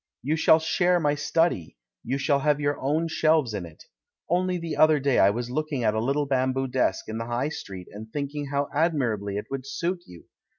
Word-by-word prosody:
You 150 +5 +1
shall 160 0 +5
share 175 +2 +2
my 145 -3 +2
study 145 - 0
— - - -65
you 130 +3 -1
shall 140 0 +2
have 150 +1 +2
your 145 0 -1
own 155 +5 0
shelves 155 -6 +2
in 95 -4 -4
it. 80 - -16 0.4
Only 180 +1 +1
the 165 -2 -4
other 155 -1 +5
day 135 -1 +2
I 95 - +6
was 120 +4 -3
looking 150 -2 -2
at 110 -1 +2
a 110 - 0
little 140 +4 +1
bamboo 130 0 0
desk 125 -7 0
in 110 +1 -4
the 115 - -4
High 120 +5 -1
Street, 95 - -8
and 110 +2 -10
think 140 +1 -3
ing 145 -1 -4
how 140 +1 -1
admirably 125 - 0
it 105 - -4
would 135 -1 -4
suit 175 +5 -2
you. 85 -1 -13
140 Hz, 220 wpm, -26 LUFS, 115-155 Hz, 0.4 s, I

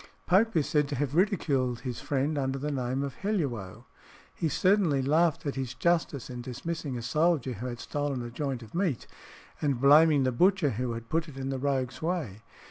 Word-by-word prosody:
Pope 210 +5 +3
is 155 -4 +3
said 150 -2 +2
to 145 - -3
have 140 0 -2
ridiculed 145 - +1
his 125 -2 -5
friend 145 +2 0
under 135 -1 -1
the 145 +2 -3
name 130 0 -1
of 140 -2 -5
Helluo. 125 - -3 0.5
He 160 - -1
certainly 180 -5 +2
laughed 155 +4 +2
at 140 - -1
his 130 -2 -4
justice 165 -4 0
in 125 -1 -6
dismissing 135 +2 -4
a 120 - -6
soldier 150 -2 +1
who 120 +4 -5
had 120 -1 -6
stolen 145 -4 -3
a 120 - -7
joint 130 -1 -3
of 110 - -14
meat, 170 - -1 0.6
and 140 -5 0
blaming 145 +1 +6
the 130 - +2
butcher 180 +3 +3
who 120 +1 -2
had 115 0 -7
put 165 +1 0
it 135 - -12
in 135 0 -3
the 135 -1 -2
rogue's 130 -2 -1
way. 155 - -2
140 Hz, 200 wpm, -28 LUFS, 125-160 Hz, 0.6 s, blaming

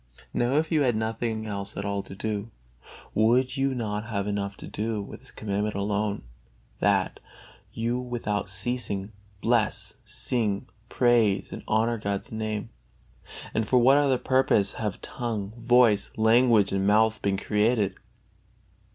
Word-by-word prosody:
Now 120 +3 +1
if 155 +2 +1
you 155 -2 +3
had 125 -5 +2
nothing 110 0 -2
else 100 -2 -4
at 100 - -3
all 100 0 -1
to 95 - -10
do, 105 +1 -3 0.6
would 125 +4 +3
you 135 -1 0
not 105 -3 -3
have 100 -4 -2
enough 100 -1 -3
to - - -8
do 110 +1 -2
with 100 - -7
this 130 - -15
Commandment 105 0 -2
alone, 100 +1 -1 0.6
that - - +1 0.5
you 120 +2 -1
without 115 -5 -3
ceasing 100 0 -2 0.3
bless, 115 -2 +1
sing, 105 -5 -2 0.2
praise 115 -5 +2
and - - -6
honor 115 +1 +1
God's 100 -2 -3
Name? 110 -1 -3 0.8
And 110 -1 0
for 125 - +4
what 130 +4 +6
other 140 -3 +3
purpose 130 -6 +2
have 105 -4 -3
tongue, 110 -5 -4
voice, 120 -3 +4
language 110 -2 +4
and 95 0 0
mouth 110 +1 +3
been 100 -1 +1
created? 105 0 +1
110 Hz, 145 wpm, -26 LUFS, 100-120 Hz, 0.8 s, what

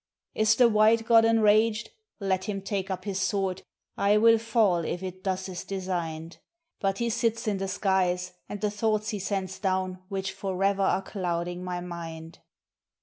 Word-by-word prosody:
"Is 220 +1 +3
the 245 +1 +6
White 220 +1 +4
God 225 -1 +6
enraged? 220 -1 +3 0.3
Let 190 -2 -1
him 195 -2 -4
take 195 -1 -3
up 185 0 -4
his 195 -2 -2
sword, 190 -1 -1 0.3
I 205 +1 +3
will 225 +1 +6
fall 220 -5 +2
if 175 +3 -3
it 185 0 -7
thus 190 -1 -2
is 185 -2 -6
designed; 175 -4 -4 0.4
But 195 -1 0
he 235 +1 0
sits 230 0 0
in 205 -2 +1
the 195 - -2
skies, 185 -2 0 0.2
and 205 - -5
the 210 -1 0
thoughts 215 0 0
he 210 - -3
sends 190 -1 -3
down 185 -2 -1
which 190 -1 -3
forever 195 +1 -1
are 195 0 +2
clouding 175 -2 -3
my 180 -1 -3
mind." 165 -2 -8
195 Hz, 170 wpm, -27 LUFS, 185-215 Hz, 0.4 s, the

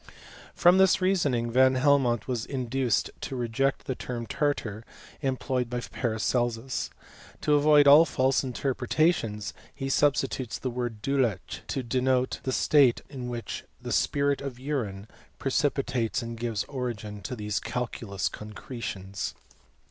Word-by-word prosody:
From 180 +2 +6
this 190 0 +5
reasoning 145 -11 +1
Van 130 +2 +5
Helmont 130 -4 +3
was 125 -4 -1
induced 130 -2 0
to 135 - -4
reject 125 +3 0
the 130 - -1
term 120 -1 -5
tartar, 115 -6 -1 0.4
employed 130 -2 -1
by 125 0 -2
Paracelsus. 120 +1 -1 0.5
To 150 - +2
avoid 145 0 +6
all 145 +3 +9
fiJse 135 -4 +1
interpretations 130 -3 0 0.2
he 135 -1 -4
substitutes 135 -3 +1
the 130 - -3
word 120 -3 -4
duelechy 110 -8 -1
to 135 - -2
denote 130 +2 +1
the 130 - -2
state 135 -2 +4
in 125 -3 -6
which 120 -1 -5 0.2
the 125 -1 -6
spirit 140 +10 +1
of 135 -3 -6
urine 115 -8 -3 0.3
precipi 135 0 +1
tates 115 -2 -1
and 115 0 -5
gives 115 -3 -2
origin 110 -6 -5
to 115 +7 -5
these 105 -2 -2
calculous 115 -5 -3
concretions. 105 -3 -6
125 Hz, 135 wpm, -27 LUFS, 115-135 Hz, 0.5 s, all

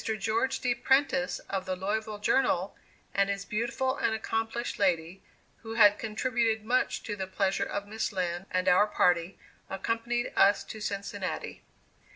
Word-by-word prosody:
George 225 +5 0
D. 250 -1 +2
Prentice, 265 +1 +2
of 190 -1 -3
the 185 - -1
Louisville 210 +3 -2
Journal, 235 +6 +1 0.4
and 200 0 +2
his 200 0 -2
beautiful 250 +5 -1
and 220 - +1
accomplished 225 +2 -3
lady, 180 -1 0 0.4
who 225 0 -7
had 205 -2 +6
contributed 225 0 0
much 250 +3 +1
to 210 - -4
the 190 -2 -4
pleasure 195 +1 0
of 200 0 -3
Miss 220 +2 -2
Lind 180 -1 -2
and 185 0 -1
our 185 +3 +5
party, 175 -3 +1 0.3
accompanied 230 +5 -2
us 200 0 +5
to 215 +2 -9
Cincinnati. 200 -1 -4
210 Hz, 150 wpm, -29 LUFS, 195-230 Hz, 0.4 s, had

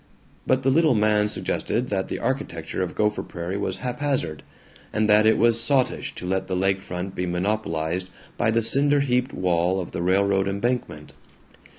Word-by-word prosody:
But 130 0 +2
the 135 - +3
little 155 -2 +4
man 105 0 +2
suggested 115 +3 -2
that 95 -2 -1
the - - -4
architecture 95 - -3
of 90 -2 -3
Gopher 105 0 +1
Prairie 85 +2 -5
was 100 - -2
haphazard, 125 - -2 0.5
and 110 0 +1
that 105 +1 +5
it 110 - +4
was 115 0 +3
sottish 130 +2 0
to - - -7
let 95 +1 -1
the 95 - -2
lake 95 +1 +1
front 90 +1 -5
be 90 -1 -3
monopolized 90 -2 -2 0.3
by 120 - +1
the 115 +1 +2
cinder 140 +4 +4
heaped 125 -1 0
wall 90 +1 +1
of 90 - -5
the - - -4
railroad 95 +2 +2
embankment. 100 -7 -3
105 Hz, 175 wpm, -24 LUFS, 90-120 Hz, 0.5 s, that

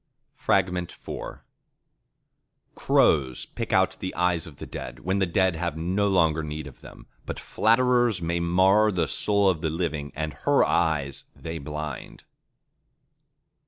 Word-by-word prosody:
IV 95 -2 +5 2.1
Crows 65 -5 +2
pick - - -6
out - - +2
the 95 - -5
eyes 90 -2 +1
of 75 - -12
the - - -8
dead, 60 0 -8
when 95 +5 0
the 95 - +2
dead 95 +1 +2
have 80 -1 -3
no 95 +5 0
longer 80 -5 +2
need 75 -1 -5
of 70 - -12
them; - - -13 0.2
but - - -4
flatterers 120 -2 +2
mar 90 +5 +3
the 85 -5 0
soul 100 +5 +1
of 90 -5 +1
the 80 - 0
living, 80 -3 -3
and 80 -1 -3
her 70 - +2
eyes 70 -4 0
they 80 0 -6
blind. 75 -1 -7
85 Hz, 135 wpm, -25 LUFS, 75-95 Hz, 2.1 s, IV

